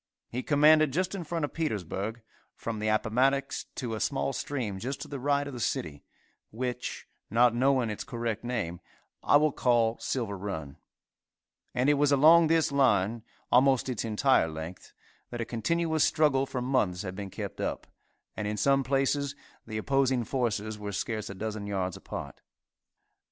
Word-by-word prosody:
He 125 - -3
commanded 150 +1 +5
just 185 +6 -1
in 195 -3 -4
front 165 -1 -2
of - - -10
Petersburg, 110 - -3 0.3
from 115 -2 -4
the 110 - -2
Appomattox 125 +6 +1
to 120 -4 -4
a 110 - -3
small 135 +1 -1
stream 120 -9 -3
just 130 +6 -4
to - - -6
the 140 - -6
right 140 +2 +1
of 140 - -7
the 125 - -6
city, 75 -9 -2 0.5
which, 125 +2 -4 0.2
not 120 +2 +4
knowing 130 -2 +2
its 105 - -5
correct 115 -3 -3
name, 105 -9 -3 0.4
I - - +5
will 150 0 +3
call 120 -3 +2
Silver 115 -6 -2
run; 80 -8 -5 1.0
and 125 +2 +2
it 145 -1 +4
was 145 0 +3
along 160 +4 +7
this 160 -2 +2
line, 115 -5 +2 0.3
almost 130 0 +4
its 120 -5 -2
entire 115 -1 +3
length, 80 +3 -8 0.4
that 120 - -6
a 115 - -1
continuous 160 +8 0
struggle 135 -3 +3
for 125 -2 -3
months 105 -9 0
had 95 -1 -5
been 100 0 -6
kept - - -6
up, - - -3 0.5
and 105 - -3
in 105 0 -2
some 135 +3 +3
places 135 +2 0 0.3
the 110 -1 -4
opposing 130 +1 +1
forces 110 -3 -2
were 105 0 -5
scarce 110 +1 -3
a 100 - -7
dozen 105 0 -4
yards 95 -3 -2
apart. - - -8
125 Hz, 165 wpm, -29 LUFS, 105-140 Hz, 1.0 s, along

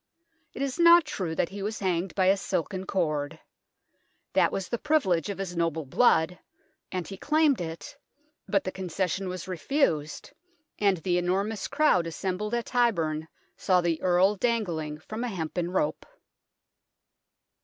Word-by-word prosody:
It 275 - -2
is 275 +3 -3
not 340 -1 +7
true 180 - -3
that 170 - 0
he 200 +2 -7
was 215 +3 -3
hanged 185 -1 -1
by 190 - +2
a 190 +1 +5
silken 190 0 -3
cord. 155 -4 -1 0.9
That - - +4
was 190 -1 -3
the 235 - -3
privilege 205 - +1
of 200 - -4
his 190 -2 -5
noble 165 -2 -1
blood, 175 - +3 0.5
and 185 -2 -3
he 195 - -7
claimed 300 - +2
it, 170 - -6 0.5
but 200 -2 +1
the 185 - -3
con 190 -1 -6
cession 190 +2 -1
was 185 0 -6
refused, 180 - -1 0.5
and 200 -3 +3
the 175 +2 0
enormous 195 +4 -1
crowd 275 - +3
assembled 195 +6 -3
at 235 - -2
Tyburn 165 -11 +1 0.3
saw 185 -2 +2
the 170 -2 0
Earl 185 +3 +3
dangling 175 -10 -1
from 215 +9 -6
a - - -1
hempen 175 -3 -3
rope. 180 -5 -1
185 Hz, 155 wpm, -27 LUFS, 170-215 Hz, 0.9 s, not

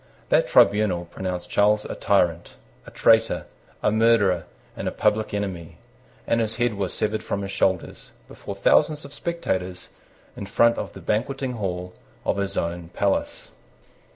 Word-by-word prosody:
That - - +3
tribunal 100 -4 +4
pronounced 90 +1 -5
Charles 105 +1 +3
a - - -5
tyrant, 85 -4 +1 0.3
a - - -7
traitor, 115 0 +3 0.4
a 105 - +3
murderer, 110 -6 +3 0.3
and - - -4
a - - 0
public 105 0 +1
enemy; 95 -5 -4 0.5
and 115 - +1
his 110 -1 -1
head 120 -1 +1
was 100 -3 -3
severed 110 0 -2
from 100 - -3
his 100 - -5
shoulders, 95 -2 -1 0.2
before 100 - -8
thousands 150 +9 +3
of 140 - -11
spectators, 95 - -3 0.5
in 100 - -7
front 115 +4 +3
of - - -5
the - - -10
banqueting 130 +4 -1
hall 90 -5 -4 0.3
of - - 0
his 100 0 -2
own 85 0 -3
palace. 100 +2 -1
100 Hz, 155 wpm, -24 LUFS, 90-110 Hz, 0.5 s, tribunal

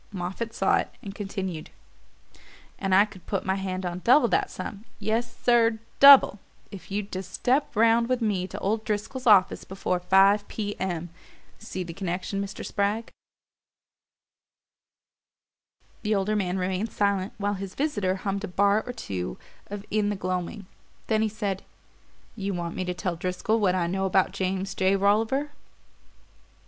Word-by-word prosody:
Moffatt 195 +4 -4
saw 195 - +2
it - - -2
and 195 - -6
continued. 195 -5 -5 1.1
"And 195 -2 +2
I 200 +2 +7
could 195 -4 -15
put 195 - -2
my 190 - +1
hand 190 -1 -3
on 175 0 -3
double 255 +1 +6
that - - +1
sum 195 +2 -7
yes, 225 +3 -2
sir, 230 -2 +4 0.2
DOUBLE 275 -7 +9 0.3
if 195 - -10
you'd 200 0 -3
just 185 0 -5
step 265 +4 0
round 230 +2 +4
with 255 -1 +1
me 200 -5 0
to - - -8
old 215 +3 -1
Driscoll's 220 +4 -3
office 195 -4 +5
before 185 -1 -2
five 195 +3 +4
P. 205 -2 -4
M. 175 -3 -3 0.5
See 185 -4 -5
the 170 -1 -7
connection, 190 +2 -3
Mr. 200 0 -6
Spragg?" 205 +3 -1 2.9
The 215 0 +1
older 200 +2 0
man 190 -3 0
remained 190 +4 -2
silent 200 -2 0
while 205 0 -1
his 195 -1 -6
visitor 205 -11 0
hummed 195 +1 -3
a - - -2
bar 200 +3 +2
or 245 - -4
two 90 - -5 0.3
of 205 0 -7
"In 210 -1 +1
the 205 - -1
Gloaming"; 185 +2 -3 0.4
then 220 -1 +1
he 220 - +1
said: 200 -3 -3 0.7
"You 200 -3 -3
want 170 -1 -4
me - - -2
to 180 0 -3
tell 175 0 -2
Driscoll 185 +6 -1
what 190 -4 +2
I 180 -2 +1
know 190 +2 -1
about 190 0 +2
James 190 0 -2
J. 190 +1 +2
Rolliver?" 220 +9 +1
200 Hz, 160 wpm, -26 LUFS, 185-215 Hz, 2.9 s, DOUBLE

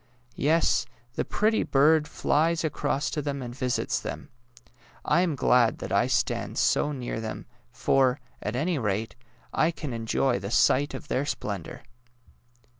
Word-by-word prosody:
Yes; 160 +4 +2 0.3
the - - -1
pretty 220 +1 +1
bird 150 +2 +3
flies 160 +2 +1
across 150 -1 -1
to 150 - -2
them 140 -2 -3
and 120 -1 -6
visits 125 -2 -1
them. - - -7 0.8
I 175 - +3
am 170 -5 0
glad 125 -3 +3
that - - -7
I - - +3
stand - - -1
so 150 - +2
near 125 -5 -4
them, 110 -1 -6 0.3
for, 135 -1 +2 0.2
at 105 - -3
any 155 +4 0
rate, 105 0 -2 0.4
I 155 - +3
can 150 -5 -5
enjoy 115 +1 0
the 100 0 -5
sight 140 +5 +3
of - - -8
their 140 +1 -1
splendour! 100 - -5
135 Hz, 150 wpm, -27 LUFS, 120-155 Hz, 0.8 s, bird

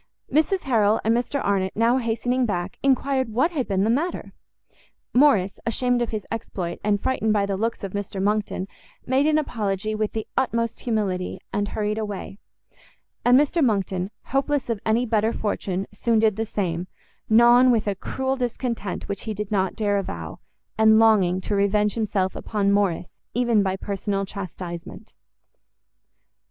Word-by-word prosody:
Mrs 320 +6 +2
Harrel 220 -4 +2
and 225 +2 +3
Mr 250 +4 -1
Arnott, 190 -2 0
now 230 +3 +3
hastening 245 +2 0
back, 180 -2 -3
enquired 270 -2 +1
what 255 +10 +1
had 280 -7 -2
been 195 -1 +1
the 215 - +1
matter? 315 +9 -2 0.8
Morrice, 230 -8 +4
ashamed 245 +1 +1
of 240 - 0
his 215 -3 -4
exploit, 190 -6 -4
and 205 -1 +2
frightened 220 -2 0
by 205 -1 +2
the 200 -1 -2
looks 225 +3 -2
of 195 - -4
Mr 200 -1 -4
Monckton, 200 -1 -1 0.4
made 265 +3 +2
an 310 0 +3
apology 215 -7 -2
with 215 0 -2
the 220 -1 -3
utmost 230 -3 0
humility, 195 -6 -1 0.2
and 205 0 0
hurried 210 +1 -2
away: 205 -2 -5 0.8
and 245 +2 +6
Mr 295 +3 +2
Monckton, 195 -5 0
hopeless 275 -2 0
of 225 - -2
any 230 +3 +2
better 220 -1 +1
fortune, 195 -3 -2
soon 225 +3 +1
did 215 -2 +3
the 225 +1 -2
same, 180 -4 -2 0.4
gnawn 240 +3 +6
with 230 -3 +2
a 205 - 0
cruel 265 +7 -2
discontent 240 -5 -3
which 200 - -4
he 220 -1 -3
did 210 0 -5
not 190 -2 0
dare 205 -2 +1
avow, 85 - -6 0.4
and 220 0 +6
longing 205 -5 +4
to 205 - -3
revenge 205 +1 +2
himself 200 -4 -1
upon 200 -2 0
Morrice, 195 -4 0 0.2
even 235 -3 +3
by 190 -1 0
personal 200 0 -2
chastisement. 185 +1 -8
215 Hz, 160 wpm, -24 LUFS, 195-240 Hz, 0.8 s, and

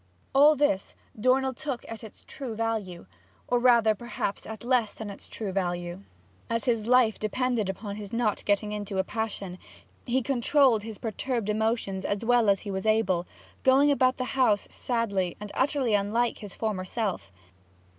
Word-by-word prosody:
All 290 +3 +7
this 280 -9 0 0.2
Dornell 260 +4 +2
took 270 -2 -5
at 225 0 -8
its 220 - -11
true 250 -5 -6
value, 215 - -3 0.4
or 245 - +2
rather, 235 -3 +5
perhaps, 215 -2 -4
at 220 0 -8
less 240 -3 +1
than 215 -2 -6
its 200 - -10
true 210 -4 -4
value. 175 -1 -2 0.5
As 230 -1 -1
his 230 -3 +1
life 245 -3 +4
depended 225 -1 0
upon 200 +1 -5
his 205 -2 -7
not 230 -3 0
getting 205 +1 +1
into 205 -1 -4
a 190 - +2
passion, 200 -5 -4 0.5
he 255 +1 +1
controlled 260 -2 +3
his 220 -1 -7
perturbed 230 0 -2
emotions 215 -3 0
as 205 +3 -2
well 240 -2 +4
as 195 -1 +3
he 205 - -5
was 190 +2 -3
able, 190 -5 +2 0.3
going 275 +2 +5
about 255 -2 +3
the 255 - -2
house 245 -6 +3
sadly 200 -7 -1
and 210 0 -7
utterly 265 -4 +1
unlike 215 +4 +1
his 205 -4 -9
former 210 -4 -2
self. 185 - -3
220 Hz, 165 wpm, -27 LUFS, 200-245 Hz, 0.5 s, All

